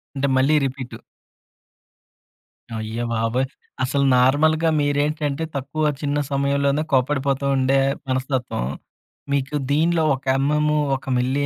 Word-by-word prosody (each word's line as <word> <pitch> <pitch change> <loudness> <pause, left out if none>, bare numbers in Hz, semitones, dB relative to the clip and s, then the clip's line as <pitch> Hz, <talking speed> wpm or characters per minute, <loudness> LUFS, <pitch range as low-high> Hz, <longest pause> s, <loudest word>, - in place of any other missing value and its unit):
అంటే 140 0 0
మళ్ళీ 135 +4 +3
రిపీటూ. 130 -2 -6 1.8
అయ్యోబాబోయ్! 115 +2 -1 0.4
అసలు 140 +2 +1
నార్మల్‌గా 155 +6 +3
మీరేంటంటే 145 +1 0
తక్కువ 140 +3 -3 0.2
చిన్న 145 -1 -1
సమయంలోనే 140 +1 +1
కోప్పడిపోతూ 135 +1 +1
ఉండే 135 +1 +3 0.3
మనస్తత్వం. 130 - -2 0.7
మీకు 140 +1 -1 0.2
దీనిలో 160 +3 +2
ఒక 135 - -13
ఎమ్‌ఎమ్ 150 +2 +1 0.2
ఒక 135 - -8
మిల్లీ 130 +3 0
140 Hz, 100 wpm, -22 LUFS, 130-145 Hz, 1.8 s, మళ్ళీ